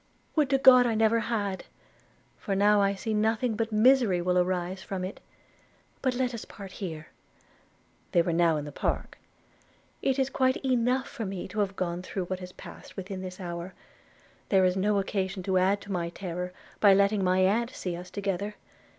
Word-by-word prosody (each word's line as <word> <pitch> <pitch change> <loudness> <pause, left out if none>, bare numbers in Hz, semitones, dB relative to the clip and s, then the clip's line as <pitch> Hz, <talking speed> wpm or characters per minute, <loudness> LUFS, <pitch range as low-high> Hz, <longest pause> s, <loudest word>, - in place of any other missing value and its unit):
'Would 300 -4 +3
to 275 - +4
God 255 -2 +7
I 230 - 0
never 225 +1 +3
had! 210 -4 -2 0.7
for 195 - -3
now 205 +1 +4
I 200 0 +2
see 220 +3 -3
nothing 220 +2 +1
but 225 +1 -2
misery 220 -3 +4
will 180 +1 0
arise 180 +1 -1
from 190 -1 -4
it. 185 - -7 0.8
But 260 -2 0
let 250 -1 0
us 230 - -5
part 195 -2 -10
here:' 160 -6 -6 1.0
(they 170 - +4
were 170 - -1
now 165 -2 +3
in 150 - -4
the 145 - -7
park) - - -3 0.8
'it 265 0 +1
is 265 0 0
quite 260 -1 +2
enough 255 +1 +1
for 230 - -6
me 190 -2 -5
to 215 +3 -4
have 200 -1 0
gone 175 -1 -2
through 185 0 -4
what 185 +1 -4
has 180 0 -8
passed - - -12
within 190 0 -5
this 185 -1 -7
hour; 175 0 -6 0.7
there 190 -2 +4
is 180 0 +2
no 205 +2 +1
occasion 195 -1 -2
to 185 0 +2
add 195 +2 +2
to 200 - -9
my 170 -2 -1
terror, 180 0 -5 0.3
by 200 -2 +7
letting 200 0 +3
my 185 0 +3
aunt 220 +5 +2
see 180 -8 -5
us 180 +1 -8
together. 200 +1 -3
195 Hz, 190 wpm, -28 LUFS, 185-225 Hz, 1.0 s, God